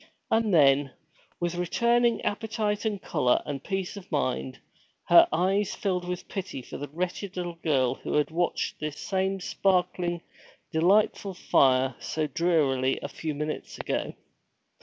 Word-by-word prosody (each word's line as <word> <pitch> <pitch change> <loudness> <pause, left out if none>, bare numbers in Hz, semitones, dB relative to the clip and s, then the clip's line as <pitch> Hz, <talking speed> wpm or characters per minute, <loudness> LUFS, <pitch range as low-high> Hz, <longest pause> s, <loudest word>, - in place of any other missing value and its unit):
And 225 -1 +2
then, 140 -4 +4 0.5
with 175 0 -1
returning 235 +7 +2
appetite 215 0 -1
and 210 -2 -1
color 130 -9 +1
and 140 -2 -5
peace 195 0 -3
of 200 -3 -11
mind, 65 0 -1 0.5
her - - +8
eyes 190 +5 +1
filled 185 -5 -2
with 180 0 -4
pity 185 -9 -5
for - - -8
the 145 - -5
wretched 180 +5 -4
little 175 -2 -4
girl 130 -6 +2
who - - -5
had 150 +1 +2
watched 175 +2 -1
this 150 -1 -4
same 190 0 -1
sparkling, 180 -2 0 0.5
delightful 195 +3 +2
fire 130 -5 +3
so 155 -1 -2
drearily 145 -6 +1
a - - -2
few 155 +1 -5
minutes 150 +1 -4
ago. - - -3
175 Hz, 140 wpm, -27 LUFS, 145-195 Hz, 0.5 s, her